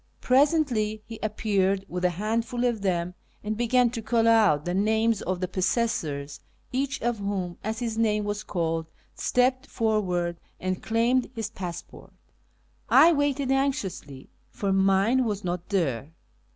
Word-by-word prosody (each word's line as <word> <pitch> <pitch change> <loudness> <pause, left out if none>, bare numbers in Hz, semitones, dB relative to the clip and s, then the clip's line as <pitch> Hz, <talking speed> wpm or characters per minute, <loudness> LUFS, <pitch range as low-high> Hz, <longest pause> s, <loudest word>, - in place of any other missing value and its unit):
Presently 255 -6 +2
he 225 -1 -9
ap 215 0 -3
peared 195 -2 +1
with 180 0 -5
a 180 - +4
handful 225 +6 -1
of 235 -4 0
them 180 -2 -1 0.3
and 215 +1 -2
began 240 +1 +2
to 235 -2 -4
call 225 +1 +1
out 210 -10 +4
the 175 - -1
names 220 +2 +2
of 185 0 -2
the 185 - 0
possessors, 180 - -1 0.3
each 275 +2 -1
of 240 -2 0
whom, 195 -3 -3
as 220 +1 -3
his 225 -2 -3
name 210 -2 +2
was 205 +1 -3
called, 165 -4 -2 0.3
stepped 255 +1 +1
forward 180 -7 -1 0.2
and 185 0 -2
claimed 235 +3 +1
his 220 -1 -4
passport. 180 -5 -8 0.8
I 340 +1 +7
waited 285 -2 0
anxiously, 195 - -2 0.2
for 195 -1 -2
mine 195 +6 +3
was 210 -3 -2
not 175 -1 -4
there. 145 - -1
215 Hz, 150 wpm, -26 LUFS, 185-235 Hz, 0.8 s, I